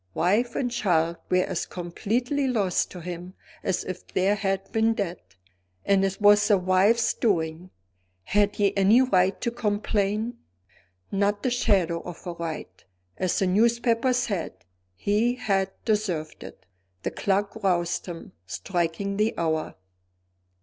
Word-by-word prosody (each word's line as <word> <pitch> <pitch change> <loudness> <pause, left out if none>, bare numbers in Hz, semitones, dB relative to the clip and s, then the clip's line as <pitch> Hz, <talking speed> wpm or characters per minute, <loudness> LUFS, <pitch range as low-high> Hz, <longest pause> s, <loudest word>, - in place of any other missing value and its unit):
Wife 220 +8 +1
and 245 -2 -1
child 170 -8 +1
were 185 0 +3
as 180 -3 -3
completely 235 +10 -2
lost 205 -8 +1
to 180 - -9
him 180 +2 -7 0.3
as 190 - -1
if 185 -1 -7
they 185 - -1
had 195 -2 -2
been 225 0 +2
dead 180 -5 -3 0.6
and 195 -1 +3
it 195 0 -1
was 205 0 +6
the 205 -2 +5
wife's 190 +5 +3
doing. 170 -4 -1 0.5
Had 205 - +2
he 200 -1 +1
any 205 +6 +5
right 190 -6 +2
to 235 - 0
complain? 210 +1 -1 0.7
Not 205 +1 0
the 255 - +1
shadow 190 -9 +1
of 175 -2 -10
a 175 - -4
right. 160 - -6 0.3
As 185 -2 0
the 195 - +2
newspapers 235 +5 +2
said, 210 - -3 0.3
he 210 - +1
had 195 -6 0 0.2
deserved 195 -8 -1
it. 95 - -12 0.4
The - - -2
clock 200 +1 0
roused 175 -2 0
him, 170 -2 -8 0.2
striking 175 - -2
the 215 +2 +1
hour. 160 -2 -1
195 Hz, 140 wpm, -26 LUFS, 180-220 Hz, 0.7 s, was